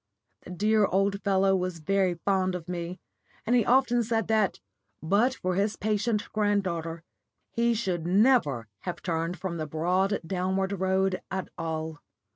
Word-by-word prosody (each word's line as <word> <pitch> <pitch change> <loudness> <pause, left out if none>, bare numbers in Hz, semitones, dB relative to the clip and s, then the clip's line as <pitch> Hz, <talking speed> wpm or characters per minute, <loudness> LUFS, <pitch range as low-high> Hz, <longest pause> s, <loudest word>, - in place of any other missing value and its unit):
The - - -13
dear 210 +3 +2
old 195 +1 +1
fellow 195 -1 +3
was 180 -2 -2
very 185 +2 +1
fond 185 +1 0
of 170 -2 -6
me, 175 +1 -4 0.5
and 240 +3 +2
he 240 - +4
often 245 0 +3
said 225 -2 0
that, 215 -3 +2 0.4
but 210 +10 +2
for 185 -6 -2
his 200 +3 0
patient 210 0 0
granddaughter, 180 -6 -1 0.5
he 235 0 +1
should 180 -7 -2
never 180 - +3
have 180 - -6
turned 165 0 -2
from 175 -2 -4
the 155 -1 -3
broad 180 +6 +1
downward 190 +2 -1
road 190 0 +1
at 190 0 -4
all. 160 -1 -4
190 Hz, 150 wpm, -28 LUFS, 175-210 Hz, 0.5 s, he